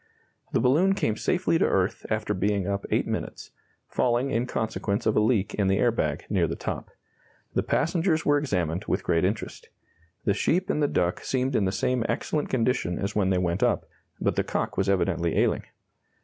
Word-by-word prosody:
The - - +2
balloon 175 +10 +3
came 110 - 0
safely 175 +4 +1
to - - +4
earth 95 +4 0
after 110 -1 -1
being 100 0 0
up 100 0 -2
eight - - +1
minutes - - -5 0.4
falling 125 +2 +1
in 120 0 0
consequence 110 -3 -2
of 110 - +2
a - - +5
leak 105 -2 +1
in 100 -2 +1
the 95 0 +2
air 120 +3 +3
bag 75 -10 -2
near 90 -5 +1
the 80 - -3
top. - - -5 0.6
The - - +2
passengers 165 0 +1
were 145 0 +4
examined 90 - -1
with 95 - -1
great 85 -1 +1
interest. 100 +4 -3 0.6
The 100 - +3
sheep 175 - +1
and 150 - 0
the 145 - +3
duck 90 -8 0
seemed 130 0 0
in 100 - +2
the 95 - +1
same 125 +4 0
excellent 150 -2 -1
condition 115 -8 0
as 100 +1 -3
when 100 -3 +2
they 95 - +2
went 90 0 0
up, - - +2 0.3
but - - 0
the - - +1
cock - - -2
was 95 0 0
evidently 85 -3 +1
ailing. - - +1
105 Hz, 195 wpm, -26 LUFS, 95-130 Hz, 0.6 s, a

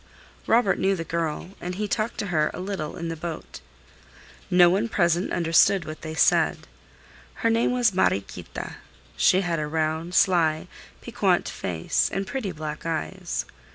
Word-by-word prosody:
Robert 225 -4 +3
knew 195 +1 +2
the 165 - -4
girl, 165 +1 -3
and 180 +1 -4
he 210 +2 -2
talked 220 +2 -2
to - - -2
her 155 -1 +2
a - - -7
little 185 -5 -4
in 170 -1 -4
the 165 - -3
boat. 165 - -7 0.9
No 180 -1 +7
one 200 +6 +1
present 175 -3 +1
understood 170 +2 +3
what 155 0 -8
they 155 0 -6
said. - - +3 0.8
Her 230 - +5
name 230 +2 +2
was 245 -4 +2
Mariequita. 100 - -2 0.4
She 180 - +4
had 170 -4 -1
a 150 - -2
round, 160 +3 -2
sly, 160 -4 +3 0.3
piquant - - +1
face 85 -3 -1
and 195 0 -2
pretty 215 -2 -3
black 155 -1 -6
eyes. 160 - -3
170 Hz, 155 wpm, -25 LUFS, 155-195 Hz, 0.9 s, No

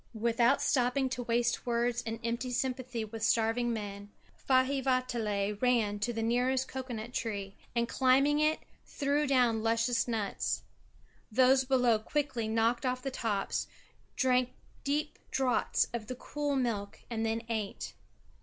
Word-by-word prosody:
Without 235 +4 +3
stopping 260 +1 +2
to 250 -1 -3
waste 240 +1 0
words 240 0 +1
in 225 -1 -5
empty 235 +2 -2
sympathy 250 -2 -2
with 220 +1 -8
starving 225 +2 +2
men, 205 -2 -5 0.3
Faivaatala 255 -6 +1
ran 230 -5 +2
to 240 +4 0
the 225 -1 -2
nearest 250 +3 +1
cocoa 260 -1 -5
nut 220 +3 -7
tree 200 -5 -3 0.2
and, 235 0 +1
climbing 270 +4 +3
it, 305 +1 +2 0.2
threw 285 +1 0
down 245 -5 +3
luscious 230 +2 +1
nuts. 220 -4 -1 0.7
Those 260 +3 +5
below 250 -4 +3
quickly 265 -1 -2
knocked 225 +2 +1
off 255 -1 -1
the 270 - -2
tops, 215 -6 -1 0.5
drank 255 -1 +2 0.3
deep 300 +2 -1
draughts 260 -2 +1
of 225 -3 -4
the 255 - -4
cool 290 +2 -2
milk 225 -6 -2
and 225 -2 -2
then 225 +1 -1
ate. 220 -4 -3
240 Hz, 140 wpm, -31 LUFS, 225-260 Hz, 0.7 s, Those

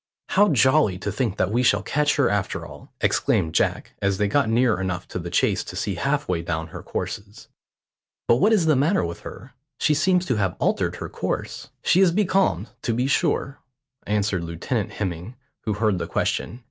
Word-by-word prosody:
"How 205 +1 +4
jolly 130 - +3
to 95 - -3
think 115 -6 -2
that 95 - +1
we 120 +3 +2
shall 105 -5 +3
catch 150 +4 +1
her 140 -4 +3
after 100 -2 -1
all," - - -13
exclaimed 80 -1 +1
Jack, - - 0
as 100 -1 +1
they 105 - +1
got 130 +2 +2
near 115 -2 +2
enough 90 -2 -3
to - - -4
the 85 0 -5
chase - - +1
to - - -8
see - - -2
halfway 90 -2 -1
down 80 -1 -3
her - - -8
courses. 105 +1 -6 0.8
"But 120 - +5
what 210 - +3
is 205 -7 +3
the 155 -2 +4
matter 150 - +2
with 85 0 -6
her? - - -10 0.2
She 150 - +2
seems 180 +4 +2
to 125 -8 0
have 95 -4 0
altered - - 0
her - - -6
course." - - -4
"She 185 - +4
is 185 -3 +5
becalmed, 190 - +1
to 115 - -1
be 125 +2 0
sure," 140 -1 0 0.5
answered 105 -3 0
Lieutenant 85 +7 -3
Hemming, 95 +3 -4 0.3
who 110 - 0
heard 105 -3 +1
the - - -3
question. 120 - -2
110 Hz, 195 wpm, -23 LUFS, 95-145 Hz, 0.8 s, But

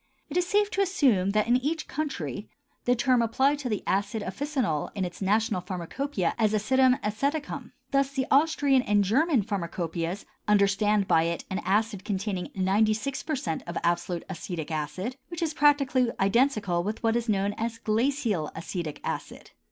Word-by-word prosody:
It 325 - -1
is 355 0 +2
safe 410 +2 +2
to 400 - +1
assume 265 - +3
that, 215 +1 +2
in 240 +1 +4
each 305 +5 -2
country, 210 - -4 0.4
the 245 - +3
term 245 0 +3
applies 265 +6 +2
to 255 - -3
the 210 -3 -2
acid 205 +2 0
officinal 235 - -2
in 195 -2 -1
its 175 +2 -8
national 210 0 +1
pharmacopœia 185 - -2
as 215 -1 +3
"Acidum 260 +4 +3
Aceticum." 280 +8 -2 0.2
Thus 275 -1 +2
the 270 -1 -1
Austrian 280 -2 +4
and 205 -3 +2
German 265 - +2
pharmacopœias 175 -2 -3 0.2
understand 205 0 +3
by 165 0 +4
it 170 0 -3
an 190 - -1
acid 210 0 0
containing 190 -2 -2
96% 215 - 0
of 170 - -4
absolute 175 0 -1
acetic 175 -3 -5
acid, 185 - -3
which 340 -1 -4
is 320 -2 -1
practically 275 -4 +3
identical 200 -4 +2
with 210 +4 -4
what 225 0 +2
is 235 -1 -1
known 200 0 +1
as 230 0 -2
glacial 225 - 0
acetic 165 -2 -5
acid. - - -5
215 Hz, 160 wpm, -27 LUFS, 190-270 Hz, 0.4 s, in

